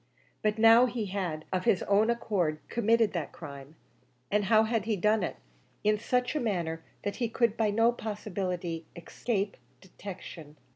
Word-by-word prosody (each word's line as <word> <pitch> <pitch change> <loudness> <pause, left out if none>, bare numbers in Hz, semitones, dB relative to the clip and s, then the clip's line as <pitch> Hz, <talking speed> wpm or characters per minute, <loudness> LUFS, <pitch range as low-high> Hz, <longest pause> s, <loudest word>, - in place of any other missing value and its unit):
But 215 0 +1
now 225 +3 +7
he 235 -3 -3
had 185 -6 -3
of 185 0 -1
his 185 - +3
own 205 +3 +3
accord 195 -9 0
committed 230 -1 +2
that 170 -4 -3
crime; 140 -1 -10 0.6
and 205 0 +2
how 220 +2 +5
had 220 -2 0
he 220 -1 +1
done 210 +3 +2
it? 180 - -2 0.5
In 210 0 +3
such 250 +4 0
a - - +1
manner 170 - -2 0.2
that 205 - -3
he 235 -3 -1
could 230 -1 +1
by 220 -2 +1
no 225 +3 +4
possibility 185 -7 -4
escape 200 +3 -3 0.2
detection. 180 -5 -10
205 Hz, 160 wpm, -29 LUFS, 180-225 Hz, 0.6 s, now